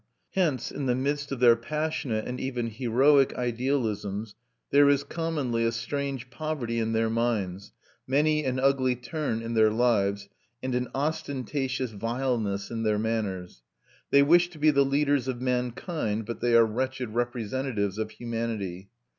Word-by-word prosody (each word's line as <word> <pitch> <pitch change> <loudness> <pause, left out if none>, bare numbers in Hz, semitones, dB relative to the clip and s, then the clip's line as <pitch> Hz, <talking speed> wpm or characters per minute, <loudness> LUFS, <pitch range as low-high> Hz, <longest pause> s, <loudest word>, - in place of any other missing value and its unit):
Hence, 160 - 0
in 140 - -3
the 125 - +2
midst 145 +2 -2
of 135 - -3
their 120 -2 +7
passionate 140 -3 -2
and 125 +1 -4
even 120 -3 -2
heroic 130 +5 +3
idealisms, 115 -4 -2 0.4
there 140 0 +6
is 140 0 +3
commonly 145 -7 -1
a 115 - +2
strange 130 +1 -4
poverty 130 -5 -3
in 115 0 0
their 115 0 +2
minds, 110 -5 -1 0.4
many 150 +3 +2
an 130 -1 -1
ugly 130 -1 +2
turn 125 -2 -3
in 115 0 -4
their 110 -1 +5
lives, 100 -4 +1 0.4
and 130 0 -2
an 125 0 0
ostentatious 135 -3 -2
vileness 115 -2 -2
in 115 -1 -3
their 110 -1 +1
manners. 105 - -3 0.5
They 140 0 +6
wish 175 +4 +5
to 175 - -14
be 155 +1 +4
the 140 -1 +4
leaders 140 -1 +1
of 125 -2 -2
mankind, 125 - -2
but 115 - -5
they 120 -1 +3
are 115 -1 +7
wretched 130 +2 -2
representatives 120 -3 -2
of 110 -1 -2
humanity. 110 -6 -4
125 Hz, 155 wpm, -27 LUFS, 115-140 Hz, 0.5 s, their